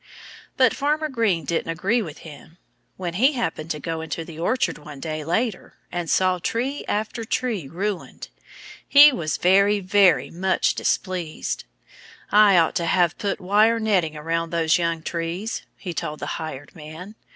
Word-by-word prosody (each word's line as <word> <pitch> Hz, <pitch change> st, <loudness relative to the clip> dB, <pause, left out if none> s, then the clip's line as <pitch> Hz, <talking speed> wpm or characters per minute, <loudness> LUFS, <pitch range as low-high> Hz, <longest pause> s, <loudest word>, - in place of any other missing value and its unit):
But 255 Hz, -3 st, +4 dB
Farmer 305 Hz, +2 st, 0 dB
Green 215 Hz, -, 0 dB
didn't 165 Hz, +1 st, -2 dB
agree 195 Hz, +9 st, 0 dB
with 165 Hz, -6 st, -8 dB
him. 160 Hz, +2 st, -13 dB, 0.4 s
When 175 Hz, -2 st, -4 dB
he 260 Hz, -, +3 dB
happened 195 Hz, -, -3 dB
to 150 Hz, -, -3 dB
go 160 Hz, +3 st, -4 dB
into 160 Hz, +1 st, -5 dB
the 160 Hz, -1 st, -10 dB
orchard 250 Hz, +2 st, 0 dB
one 145 Hz, -1 st, -11 dB
day, 155 Hz, +1 st, -4 dB
later, 210 Hz, +6 st, -2 dB, 0.2 s
and 175 Hz, -2 st, -3 dB
saw 185 Hz, -1 st, +2 dB
tree 255 Hz, -, -2 dB
after 220 Hz, +2 st, -2 dB
tree 220 Hz, -, -2 dB
ruined, 190 Hz, +6 st, -5 dB, 0.6 s
he 290 Hz, +1 st, +9 dB
was 155 Hz, -, -2 dB
very, 200 Hz, +3 st, +4 dB
very 180 Hz, -8 st, +3 dB
much 190 Hz, +2 st, +1 dB
displeased. 180 Hz, -5 st, -2 dB, 0.7 s
"I 205 Hz, -2 st, +6 dB
ought 165 Hz, -1 st, +3 dB
to 170 Hz, -2 st, -1 dB
have 175 Hz, -1 st, +2 dB
put 200 Hz, -1 st, -2 dB
wire 210 Hz, +5 st, +3 dB
netting 185 Hz, -8 st, +1 dB
around 165 Hz, +2 st, -2 dB
those 165 Hz, 0 st, +2 dB
young 170 Hz, -1 st, -1 dB
trees," 170 Hz, +8 st, -3 dB, 0.2 s
he 180 Hz, -4 st, -6 dB
told 155 Hz, -1 st, -4 dB
the -, -, -5 dB
hired 145 Hz, -3 st, -7 dB
man. 160 Hz, +5 st, -10 dB
180 Hz, 160 wpm, -23 LUFS, 160-210 Hz, 0.7 s, he